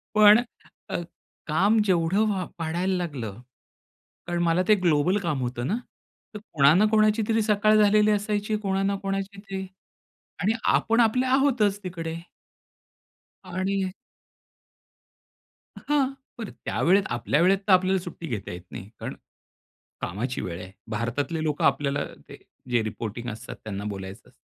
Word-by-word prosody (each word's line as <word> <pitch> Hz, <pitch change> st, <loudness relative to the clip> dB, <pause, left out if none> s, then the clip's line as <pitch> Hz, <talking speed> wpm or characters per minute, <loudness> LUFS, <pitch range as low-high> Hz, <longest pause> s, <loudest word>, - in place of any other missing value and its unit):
पण 210 Hz, +1 st, +8 dB, 0.5 s
अ, -, -, -3 dB, 0.5 s
काम 200 Hz, +8 st, +3 dB
जेवढं 185 Hz, +3 st, +2 dB
व 185 Hz, -3 st, -2 dB
वाढायला 175 Hz, +4 st, -1 dB
लागलं, 125 Hz, -, -5 dB, 0.9 s
कारण 175 Hz, 0 st, -1 dB
मला 170 Hz, +2 st, +2 dB
ते 215 Hz, -, +6 dB
ग्लोबल 175 Hz, +1 st, +2 dB
काम 150 Hz, -8 st, -2 dB
होतं 120 Hz, +1 st, -3 dB
ना, 210 Hz, -, 0 dB, 0.6 s
तर -, -, -4 dB
कोणा 140 Hz, 0 st, +6 dB
ना 210 Hz, +3 st, +5 dB
कोणाची 215 Hz, 0 st, +4 dB
तरी 225 Hz, 0 st, +3 dB
सकाळ 215 Hz, 0 st, +3 dB
झालेली 210 Hz, +1 st, +4 dB
असायची, 210 Hz, +1 st, 0 dB
कोणा 195 Hz, -2 st, -1 dB
ना 200 Hz, 0 st, +1 dB
कोणाची 195 Hz, 0 st, -3 dB
तरी 195 Hz, -1 st, -6 dB, 0.8 s
आणि 210 Hz, +5 st, +2 dB, 0.2 s
आपण 230 Hz, +1 st, +2 dB
आपले 250 Hz, +3 st, +3 dB
आहोतच 255 Hz, -7 st, +2 dB
तिकडे. 165 Hz, -3 st, -5 dB, 1.3 s
आणि 190 Hz, +1 st, -1 dB, 1.9 s
हां. 275 Hz, -2 st, 0 dB, 0.3 s
बरं 220 Hz, -4 st, -5 dB
त्यावेळेत 195 Hz, +3 st, +3 dB
आपल्या 120 Hz, +6 st, +1 dB
वेळेत 190 Hz, +2 st, +5 dB
तर 200 Hz, -, +3 dB
आपल्याला 185 Hz, +1 st, +4 dB
सुट्टी 170 Hz, -2 st, -8 dB
घेता 110 Hz, -, -4 dB
येत 90 Hz, -, -7 dB
नाही. 95 Hz, -, -8 dB
कारण -, -, -5 dB, 0.9 s
कामाची 120 Hz, +8 st, -3 dB
वेळ 85 Hz, -1 st, -5 dB
आहे. 90 Hz, +1 st, -10 dB, 0.2 s
भारतातले 140 Hz, +9 st, -2 dB
लोक 150 Hz, -2 st, -1 dB
आपल्याला 140 Hz, 0 st, +1 dB, 0.6 s
जे 120 Hz, -2 st, +2 dB
रिपोर्टींग 110 Hz, +2 st, -5 dB
असतात, 110 Hz, -, -8 dB
त्यांना 100 Hz, -2 st, -5 dB
बोलायचं 95 Hz, -1 st, -6 dB
असतं. -, -, -23 dB
185 Hz, 135 wpm, -26 LUFS, 140-210 Hz, 1.9 s, पण